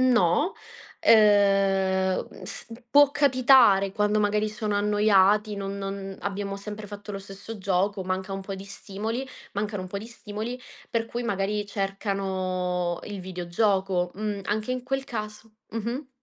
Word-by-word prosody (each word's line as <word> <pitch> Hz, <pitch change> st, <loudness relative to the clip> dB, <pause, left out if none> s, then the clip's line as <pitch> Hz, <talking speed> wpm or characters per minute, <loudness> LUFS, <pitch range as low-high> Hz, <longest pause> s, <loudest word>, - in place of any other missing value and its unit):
No. 250 Hz, -, +3 dB, 0.5 s
Ehm, 195 Hz, -3 st, +4 dB
uhm, -, -, -13 dB
s -, -, -8 dB, 0.2 s
può 290 Hz, +1 st, +7 dB
capitare 255 Hz, -8 st, +5 dB
quando 210 Hz, +1 st, +2 dB
magari 210 Hz, +1 st, +1 dB
sono 210 Hz, -1 st, -3 dB
annoiati, 210 Hz, 0 st, +3 dB
non 200 Hz, 0 st, -4 dB
non 195 Hz, 0 st, -5 dB
abbiamo 195 Hz, 0 st, -3 dB
sempre 210 Hz, +1 st, -7 dB
fatto 205 Hz, +1 st, -9 dB
lo 195 Hz, -, -4 dB
stesso 195 Hz, +3 st, -9 dB
gioco, 195 Hz, +1 st, 0 dB
manca 190 Hz, +1 st, -2 dB
un 195 Hz, 0 st, -4 dB
po' 195 Hz, 0 st, -5 dB
di 195 Hz, 0 st, -8 dB
stimoli 215 Hz, +5 st, -5 dB, 0.3 s
mancano 205 Hz, -1 st, -2 dB
un 185 Hz, -, -7 dB
po' 200 Hz, -, -5 dB
di 215 Hz, -, -8 dB
stimoli, 230 Hz, +1 st, -6 dB, 0.3 s
per 230 Hz, -1 st, 0 dB
cui 240 Hz, +1 st, -4 dB
magari 205 Hz, -2 st, -1 dB
cercano 190 Hz, -3 st, -2 dB
il 205 Hz, -2 st, -6 dB
videogioco. 185 Hz, 0 st, 0 dB
Mhmm, 210 Hz, -1 st, -3 dB
anche 215 Hz, +4 st, -1 dB
in 255 Hz, 0 st, -3 dB
quel 270 Hz, +1 st, -1 dB
caso 215 Hz, -2 st, -6 dB, 0.2 s
mh-mh. 235 Hz, +5 st, -4 dB
205 Hz, 150 wpm, -26 LUFS, 195-215 Hz, 0.5 s, può